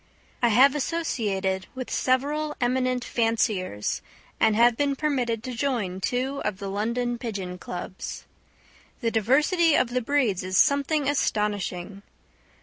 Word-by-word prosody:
I 240 Hz, -, +4 dB
have 260 Hz, +5 st, +6 dB
associated 210 Hz, -, -1 dB
with 255 Hz, -1 st, -6 dB
several 295 Hz, +4 st, 0 dB
eminent 255 Hz, 0 st, +1 dB
fanciers, 215 Hz, -, 0 dB, 0.4 s
and 220 Hz, -1 st, +4 dB
have 235 Hz, +1 st, +5 dB
been 280 Hz, +2 st, 0 dB
permitted 250 Hz, -7 st, -1 dB
to 255 Hz, -, -5 dB
join 230 Hz, -8 st, -2 dB
two 260 Hz, +6 st, -1 dB
of 210 Hz, -3 st, -2 dB
the 200 Hz, 0 st, -5 dB
London 235 Hz, +4 st, -1 dB
Pigeon 195 Hz, -7 st, -5 dB
Clubs. 180 Hz, +1 st, -6 dB, 0.8 s
The 230 Hz, -2 st, 0 dB
diversity 300 Hz, -, +3 dB
of 255 Hz, -, +2 dB
the 250 Hz, +1 st, 0 dB
breeds 240 Hz, -8 st, +1 dB
is 185 Hz, 0 st, -1 dB
something 285 Hz, +1 st, +3 dB
astonishing. 205 Hz, -7 st, -1 dB
240 Hz, 130 wpm, -26 LUFS, 205-275 Hz, 0.8 s, have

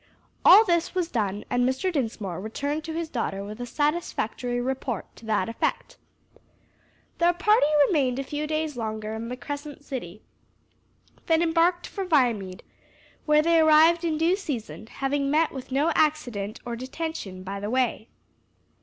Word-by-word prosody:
All 415 Hz, +5 st, +9 dB
this 340 Hz, -1 st, 0 dB
was 355 Hz, -2 st, -1 dB
done 205 Hz, -3 st, -2 dB
and 245 Hz, 0 st, +2 dB
Mr. 265 Hz, +9 st, 0 dB
Dinsmore 220 Hz, -, -3 dB
returned 285 Hz, +8 st, -3 dB
to 325 Hz, -, -5 dB
his 330 Hz, 0 st, -3 dB
daughter 210 Hz, -8 st, -3 dB
with 210 Hz, +4 st, -8 dB
a 245 Hz, -, -4 dB
satisfactory 255 Hz, -4 st, -1 dB
report 255 Hz, -3 st, -4 dB
to 225 Hz, -, -13 dB
that 210 Hz, -4 st, +1 dB
effect. 230 Hz, -, -2 dB, 1.2 s
Their 345 Hz, +1 st, +4 dB
party 375 Hz, -2 st, +3 dB, 0.2 s
remained 270 Hz, -8 st, +1 dB
a 275 Hz, -, -2 dB
few 295 Hz, +2 st, -4 dB
days 310 Hz, -1 st, -2 dB
longer 220 Hz, -2 st, -4 dB
in 225 Hz, +1 st, -5 dB
the 250 Hz, -, -5 dB
Crescent 285 Hz, +2 st, -7 dB
City, 215 Hz, -8 st, -7 dB, 1.0 s
then 325 Hz, 0 st, +3 dB
embarked 340 Hz, +2 st, +2 dB
for 395 Hz, -, -5 dB
Viamede, 235 Hz, -, +1 dB, 0.6 s
where 300 Hz, 0 st, +5 dB
they 335 Hz, 0 st, +4 dB
arrived 320 Hz, +2 st, +5 dB
in 320 Hz, -2 st, 0 dB
due 330 Hz, +4 st, +3 dB
season, 250 Hz, -, -6 dB
having 275 Hz, +3 st, -1 dB
met 310 Hz, +3 st, +2 dB
with 265 Hz, -1 st, -8 dB
no 290 Hz, +5 st, +2 dB
accident 245 Hz, -10 st, 0 dB
or 240 Hz, -1 st, -3 dB
detention 255 Hz, -, -6 dB
by 200 Hz, +1 st, -5 dB
the 205 Hz, +1 st, -4 dB
way. 245 Hz, -2 st, 0 dB
275 Hz, 155 wpm, -26 LUFS, 225-320 Hz, 1.2 s, All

